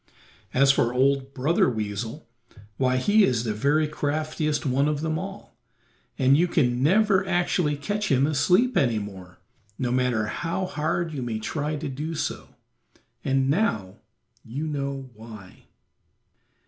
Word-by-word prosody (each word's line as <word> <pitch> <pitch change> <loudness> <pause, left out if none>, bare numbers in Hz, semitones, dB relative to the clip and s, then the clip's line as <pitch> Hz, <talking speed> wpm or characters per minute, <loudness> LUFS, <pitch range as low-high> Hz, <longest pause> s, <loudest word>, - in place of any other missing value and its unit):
As 135 +1 +5
for 120 -3 +1
old 135 +1 +2
Brother 145 +3 +2
Weasel, 110 +4 -4 0.5
why, 130 -1 +2
he 205 +11 +4
is 120 -10 +2
the 110 -3 -1
very 145 +8 +2
craftiest 150 +1 -2
one 135 +2 +2
of 150 -1 -1
them 160 0 -1
all, 195 +2 -8 0.6
and 135 +1 +4
you 170 +4 +3
can 125 -7 +1
never 195 +5 +4
actually 175 -4 +1
catch 205 +6 -2
him 135 0 +4
asleep 180 - +2
any 120 -4 +2
more, 95 -3 -8 0.4
no 125 -1 -1
matter 125 -4 +1
how 170 - -2
hard 170 -1 -2
you 140 - -4
may 120 -3 -3
try 150 +7 -3
to 150 +1 -4
do 150 +5 -4
so, 150 - -4 0.7
and 135 0 +1
now 135 - 0 0.5
you 140 +7 -5
know 140 -3 -4
why. 110 -3 -13
140 Hz, 145 wpm, -25 LUFS, 125-160 Hz, 0.7 s, As